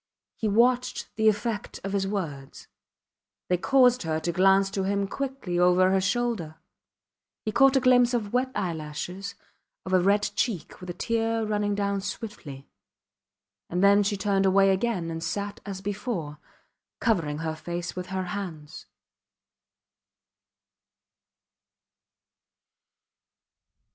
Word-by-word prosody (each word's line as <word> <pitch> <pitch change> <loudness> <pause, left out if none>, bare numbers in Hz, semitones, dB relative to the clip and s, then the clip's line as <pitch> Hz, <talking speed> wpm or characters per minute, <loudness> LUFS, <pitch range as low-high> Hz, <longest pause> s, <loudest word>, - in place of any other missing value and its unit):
He 220 - -2
watched 245 +4 +1
the 220 0 +4
effect 210 0 -3
of 195 +1 -4
his 195 -1 0
words. 155 -10 -5 0.8
They 180 - +3
caused 250 +3 +4
her 160 -2 -1
to 170 - -1
glance 195 +2 +4
to 195 - -2
him 200 +1 0
quickly 260 -8 -3
over 180 +1 +4
her 190 0 +3
shoulder. 200 -6 -1 0.9
He 215 - -1
caught 270 +4 +5
a - - +6
glimpse 245 -1 +4
of 210 -3 -3
wet 255 +1 +1
eyelashes, 175 +1 -4 0.5
of 185 - -4
a 185 - +6
red 200 +3 +3
cheek 205 -9 -2
with 180 - -8
a - - -3
tear 225 -1 0
running 205 -1 0
down 200 -1 -1
swiftly; 175 -10 -7 1.0
and 180 +2 0
then 200 +1 +6
she 205 0 0
turned 195 0 +1
away 195 +1 +5
again 190 -4 -1
and 165 0 -5
sat 205 0 -3
as 195 -1 -5
before, 195 - -4 0.6
covering 165 -10 0
her 160 - -1
face 175 +2 -5
with 180 0 -5
her 190 -1 -2
hands. 175 -6 -7
195 Hz, 130 wpm, -26 LUFS, 180-220 Hz, 1.0 s, a